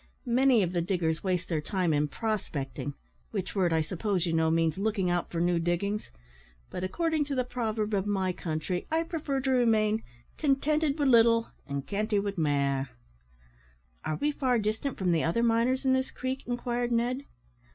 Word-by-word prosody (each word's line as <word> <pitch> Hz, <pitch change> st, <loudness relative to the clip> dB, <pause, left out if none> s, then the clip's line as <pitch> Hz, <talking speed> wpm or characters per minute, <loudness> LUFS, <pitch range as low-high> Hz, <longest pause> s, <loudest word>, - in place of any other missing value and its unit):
Many 250 Hz, -2 st, +4 dB
of 175 Hz, -, -1 dB
the 175 Hz, -1 st, 0 dB
diggers 165 Hz, -2 st, -1 dB
waste 185 Hz, -2 st, 0 dB
their 160 Hz, -3 st, -1 dB
time 180 Hz, -1 st, 0 dB
in 150 Hz, 0 st, +2 dB
prospecting, 145 Hz, -, -3 dB, 0.3 s
which 185 Hz, -, -4 dB
word, 185 Hz, -4 st, +2 dB
I 160 Hz, -1 st, +3 dB
suppose 185 Hz, +3 st, -1 dB
you 165 Hz, -, -1 dB
know, 160 Hz, 0 st, +3 dB
means 165 Hz, +1 st, +1 dB
looking 200 Hz, -3 st, 0 dB
out 175 Hz, -1 st, -1 dB
for 170 Hz, -, -3 dB
new 175 Hz, 0 st, +2 dB
diggings; 175 Hz, +5 st, -1 dB, 0.6 s
but, 180 Hz, -, -4 dB
according 320 Hz, -, 0 dB
to 285 Hz, -1 st, -3 dB
the 255 Hz, -, +1 dB
proverb 220 Hz, -4 st, -2 dB
of 200 Hz, 0 st, 0 dB
my 190 Hz, -3 st, 0 dB
country, 170 Hz, +1 st, -3 dB
I 320 Hz, +1 st, +1 dB
prefer 310 Hz, -5 st, -2 dB
to 265 Hz, 0 st, 0 dB
remain 220 Hz, -3 st, +3 dB, 0.4 s
`contented 300 Hz, +1 st, +2 dB
wi' 290 Hz, -, +1 dB
little, 230 Hz, -2 st, +5 dB, 0.2 s
and 140 Hz, -1 st, -3 dB
cantie 210 Hz, +1 st, 0 dB
wi' 200 Hz, 0 st, 0 dB
mair.'" 140 Hz, -4 st, +1 dB, 1.1 s
"Are 155 Hz, -, -1 dB
we 295 Hz, -, 0 dB
far 255 Hz, -4 st, +1 dB
distant 220 Hz, +5 st, -2 dB
from 185 Hz, -2 st, +1 dB
the 165 Hz, -2 st, +2 dB
other 200 Hz, +9 st, +1 dB
miners 235 Hz, +3 st, +2 dB
in 260 Hz, -, +4 dB
this 260 Hz, 0 st, +1 dB
creek?" 260 Hz, 0 st, -4 dB
inquired 245 Hz, 0 st, -1 dB
Ned. 245 Hz, +4 st, 0 dB
210 Hz, 180 wpm, -29 LUFS, 170-250 Hz, 1.1 s, little